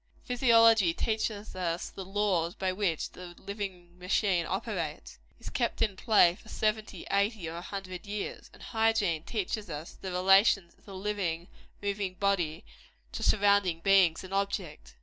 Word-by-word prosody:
Physiology 230 -7 +5
teaches 215 -2 -2
us 175 -2 -2
the 195 - -7
laws 190 -3 0
by 190 -1 -1
which 185 -4 -1
the 175 -1 -10
living 185 -4 -7
machine 180 -1 +1
operates 185 -6 -4 0.2
is - - -8
kept 240 -3 -1
in 210 -3 +1
play 190 -4 +5
for 220 +3 -16
seventy, 215 0 -2
eighty, 200 -2 +1
or 165 +1 -5
a - - -5
hundred 185 0 -7
years; 205 0 -5
and - - -15
Hygiene 220 -8 +1
teaches 210 +1 -3
us 150 +1 -6
the 190 - -7
relations 195 0 +4
of - - -29
the 195 - -10
living, 185 -4 -2 0.3
moving 200 -2 -2
human - - -29
body 180 -3 0 0.5
to - - -6
surrounding 200 -5 +3
beings 190 -3 +4
and 185 +1 -9
objects. 195 -5 -3
195 Hz, 155 wpm, -30 LUFS, 175-210 Hz, 0.5 s, Physiology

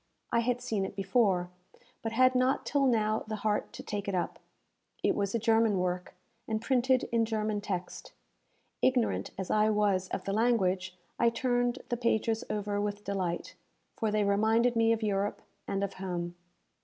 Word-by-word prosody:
I 235 - +3
had 245 +1 0
seen 220 -5 -1
it 190 - -5
before, 190 -3 +1 0.5
but 225 - -3
had 255 +3 +4
not 255 +1 +2
till 280 -2 +2
now 215 -3 +2
the 215 - -3
heart 210 0 -1
to - - -8
take 205 -1 -4
it 195 - -1
up. 180 - -2 0.6
It - - +3
was 200 +1 -1
a - - +4
German 225 -2 +3
work, 180 0 -2 0.3
and 220 -1 -1
printed 255 +2 +2
in 230 -1 +3
German 215 -2 -1
text. 180 -3 -5 0.7
Ignorant 250 -3 +2
as 190 -1 -3
I 215 0 +4
was 205 -3 +2
of - - -4
the 195 - -2
language, 190 -5 +1 0.2
I 235 - +5
turned 245 +1 0
the 240 - 0
pages 225 -1 +1
over 205 -1 -1
with 205 0 -3
delight, 185 -4 -2 0.4
for 220 - 0
they 210 0 +1
reminded 220 +4 +3
me 225 0 +4
of 225 -1 0
Europe 205 -1 -1 0.2
and 195 0 -1
of 200 -1 -2
home. 175 -2 -4
215 Hz, 175 wpm, -30 LUFS, 195-230 Hz, 0.7 s, I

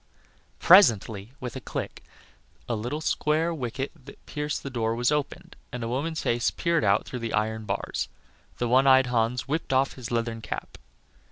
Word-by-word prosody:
Presently, 115 - +5
with 125 -2 -6
a - - -5
click, - - -5 0.6
a 120 - -1
little 120 +8 -3
square 160 +2 +1
wicket 135 -1 -4
that 140 - -14
pierced 150 -1 -3
the 140 - -5
door 115 -2 -1
was 120 +3 +1
opened, 150 -2 -3 0.2
and 125 -1 -5
a - - -2
woman's 150 +7 -2
face 120 0 +1
peered 170 -1 0
out - - +3
through 125 - -6
the 115 -1 -4
iron 110 +1 -1
bars. - - -2 0.5
The 120 - -1
one 130 +3 +4
eyed 130 -1 +7
Hans 120 0 0
whipped 155 +2 -2
off 135 +1 +2
his 125 -3 -8
leathern 115 -1 -2
cap. - - -6
125 Hz, 175 wpm, -26 LUFS, 115-145 Hz, 0.6 s, eyed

